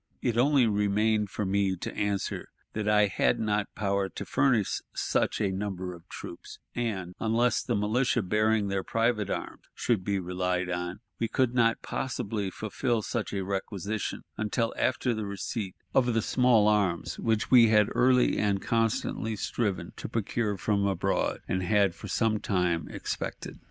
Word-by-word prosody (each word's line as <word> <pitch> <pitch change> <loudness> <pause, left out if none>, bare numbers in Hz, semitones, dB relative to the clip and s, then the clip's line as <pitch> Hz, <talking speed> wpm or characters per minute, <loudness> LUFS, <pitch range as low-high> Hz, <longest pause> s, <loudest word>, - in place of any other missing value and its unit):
It 120 - 0
only 135 +1 +4
remained 105 0 +2
for 105 - -3
me 95 0 +1
to 85 - -6
answer 100 -2 -2 0.2
that 105 -1 -2
I 105 0 +5
had 95 - +1
not 105 -1 -1
power 100 -1 0
to - - -7
furnish 120 -8 +2
such - - 0
a 100 -3 +1
number 95 -2 -3
of 85 -1 -14
troops; - - -9 0.2
and, 100 -7 -3
unless 115 +2 +2
the 120 - -1
militia 115 +3 +1
bearing 105 +2 +2
their 95 -1 -1
private 115 -3 0
arms - - -4
should 115 -6 0
be 100 +1 0
relied 90 0 -1
on, 90 +3 -3 0.2
we 115 - +1
could 125 +1 +1
not 115 -2 +2
possibly 110 -6 -2
fulfill 110 +3 -2
such 115 0 -3
a 100 -1 -2
requisition 100 +2 -3
until 110 +2 0
after 125 -1 +1
the 110 -2 -3
receipt 100 +1 -4 0.2
of 120 -3 +3
the 115 - +2
small 125 -4 +4
arms 100 -5 +1
which 110 -2 0
we 120 -3 +8
had 105 -1 +5
early 125 0 +4
and 100 -2 +1
constantly 115 -1 0
striven 105 -3 -2
to - - -6
procure 110 -1 -1
from 100 +1 +1
abroad, 95 -3 0
and 95 - 0
had 100 0 +3
for - - -9
some 110 -2 +1
time 90 -5 0
expected. - - -5
105 Hz, 160 wpm, -28 LUFS, 95-115 Hz, 0.2 s, we